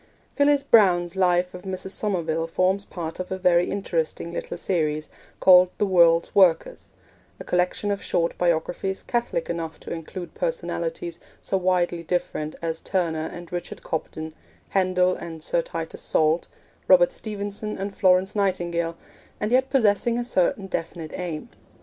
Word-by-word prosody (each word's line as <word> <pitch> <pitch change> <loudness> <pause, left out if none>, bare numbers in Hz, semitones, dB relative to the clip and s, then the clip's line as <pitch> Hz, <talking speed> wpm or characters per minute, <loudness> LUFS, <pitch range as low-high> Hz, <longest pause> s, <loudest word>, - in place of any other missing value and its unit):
Phyllis 285 0 +3
Browne's 180 -9 +4
Life 180 -1 +2
of 180 - -8
Mrs. 190 0 -5
Somerville 165 -6 -1
forms 185 +4 +1
part 165 -1 -6
of 185 - -5
a 190 - -1
very 180 -1 +3
interesting 170 -3 -2
little - - -5
series, 155 -4 -1 0.3
called 180 -1 +7
'The 210 - +2
World's 170 -3 +4
Workers' 180 -5 +3 0.5
a - - -6
collection 180 +3 0
of 200 - -2
short 170 -1 0
biographies 175 +3 0
catholic 235 -8 -1
enough 165 -2 -4
to - - -6
include 170 +2 -7
personalities - - -3 0.2
so - - -2
widely 180 -2 +1
different 155 -3 -2
as 165 -1 -2
Turner 165 -4 -1
and 175 -1 -10
Richard 175 0 -6
Cobden, 160 0 -4 0.4
Handel 185 -1 +2
and 160 -2 -8
Sir 170 - +1
Titus 165 0 -6
Salt, 155 +2 +1 0.4
Robert - - +6
Stephenson 210 - -5
and 195 +1 -4
Florence 185 +1 +3
Nightingale, 170 -4 0 0.4
and 210 +2 -2
yet 260 +1 +3
possessing 235 -2 +2
a 240 - -2
certain 195 -3 +1
definite 165 -3 -5
aim. 175 +2 -4
180 Hz, 145 wpm, -24 LUFS, 170-200 Hz, 0.5 s, called